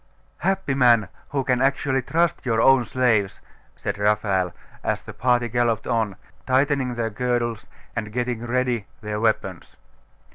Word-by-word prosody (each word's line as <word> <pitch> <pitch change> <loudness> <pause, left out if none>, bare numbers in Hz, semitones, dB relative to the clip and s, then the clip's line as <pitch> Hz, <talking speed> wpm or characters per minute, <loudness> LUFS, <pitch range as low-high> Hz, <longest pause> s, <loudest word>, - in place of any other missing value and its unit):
'Happy 190 -7 0
man, 120 -7 +4 0.2
who 140 -1 -1
can 125 -1 +1
actually 135 0 +1
trust 165 +5 0
your 115 -3 +1
own 135 +1 +5
slaves!' 110 -6 +1 0.4
said 100 0 -4
Raphael, 100 -3 +1 0.3
as - - -1
the - - -9
party 120 0 +2
galloped 120 -1 0
on, 110 -5 0 0.3
tightening 130 -1 +2
their 115 -1 -2
girdles 120 -1 -1 0.3
and 105 -3 -3
getting 120 0 -2
ready 125 -3 0
their 105 0 -3
weapons. 105 -5 -1
120 Hz, 140 wpm, -23 LUFS, 110-130 Hz, 0.4 s, own